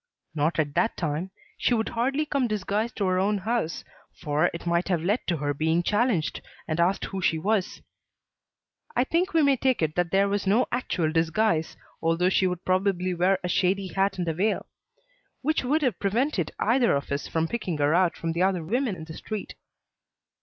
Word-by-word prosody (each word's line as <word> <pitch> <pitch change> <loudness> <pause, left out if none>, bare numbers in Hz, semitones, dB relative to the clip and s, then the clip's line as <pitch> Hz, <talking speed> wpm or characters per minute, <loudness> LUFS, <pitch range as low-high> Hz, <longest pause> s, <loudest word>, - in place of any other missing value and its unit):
"Not 155 +2 0
at 145 -3 0
that 230 +6 +1
time. 160 +2 -2 0.3
She 245 - +2
would 220 -1 -1
hardly 270 +6 0
come 280 -4 0
disguised 215 +2 -2
to 200 - -1
her 185 0 +2
own 205 +2 +1
house, 210 -4 -2 0.4
for 155 +1 +1
it 170 - -8
might 170 +1 +1
have 175 -4 0
led 205 +7 +2
to 170 - +1
her 145 0 -1
being 160 +4 +1
challenged 210 -5 +1 0.3
and 155 0 -2
asked 180 +3 +2
who 195 -1 -5
she 165 -3 +2
was. 200 +3 -1 1.1
I 245 - +3
think 345 +7 0
we 320 - +5
may 280 -2 +4
take 260 -7 +1
it 155 -1 0
that 175 0 0
there 195 +2 +3
was 200 0 -1
no 220 +6 +4
actual 170 -10 -1
disguise, 165 +1 +1 0.2
although 165 +2 +2
she 190 - +3
would 180 -1 -4
probably 185 -1 +1
wear 180 +2 +2
a - - -1
shady 190 +2 +1
hat 195 0 0
and 175 -2 -2
a 165 - +1
veil; 205 +7 0 0.8
which 310 +1 +1
would 295 +5 +1
have 245 -9 0
prevented 205 - 0
either 235 - +3
of 140 0 -4
us 140 +1 -2
from 165 0 0
picking 190 -6 -3
her 145 +1 +2
out 180 0 +2
from 165 - -2
the 170 +2 -2
other 185 -2 +2
women 235 - -1
in 160 - -9
the 160 0 -9
street." 215 +5 -6
185 Hz, 200 wpm, -26 LUFS, 165-220 Hz, 1.1 s, we